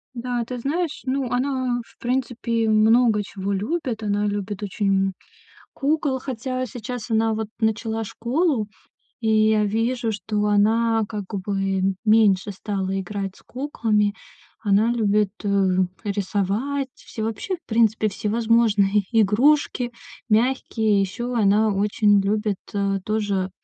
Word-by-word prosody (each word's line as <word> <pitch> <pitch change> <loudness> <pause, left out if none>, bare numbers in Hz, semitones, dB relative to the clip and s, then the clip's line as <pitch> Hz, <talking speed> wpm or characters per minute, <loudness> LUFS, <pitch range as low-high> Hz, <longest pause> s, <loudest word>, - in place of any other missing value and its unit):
Да, 240 0 -2
ты 250 +1 -5
знаешь, 305 +5 -2
ну, 260 -1 -1
она, 255 -1 0
в - - -24
принципе, 235 -2 -1
много 220 0 +4
чего 195 0 -5
любит. 230 - -2
Она 205 0 0
любит 205 0 -3
очень, 195 -1 +1
м, 190 - -4 0.6
кукол. 285 -2 0
Хотя 255 0 -3
сейчас 245 0 -6
она, 225 0 +2
вот, 220 -1 -3
начала 220 0 0
школу, 245 - 0 0.6
и 220 - 0 0.2
я 215 -1 +3
вижу, 225 +2 0
что 210 0 -2
она, 220 +2 +3
как 210 -2 -5 0.2
бы, 195 -1 0
меньше 210 -3 +4
стала 195 -1 -3
играть 195 0 -4
с - - -18
куклами. 220 -6 0 0.5
Она 210 +2 +2
любит, 210 -3 +2
э, - - -2 0.6
рисовать, 205 +7 -1
всё 220 - -7
вообще, 225 - -3
в 340 - -22
принципе, 220 -1 +2
всевозможные 215 -2 +2
игрушки, 240 +3 +3 0.4
мягкие. 220 -2 +2
Ещё 240 +6 -3
она 215 -1 +3
очень 205 +1 +3
любит, 210 0 0 0.2
э, 200 -1 0
тоже, 205 -3 -1
220 Hz, 125 wpm, -23 LUFS, 205-240 Hz, 0.6 s, много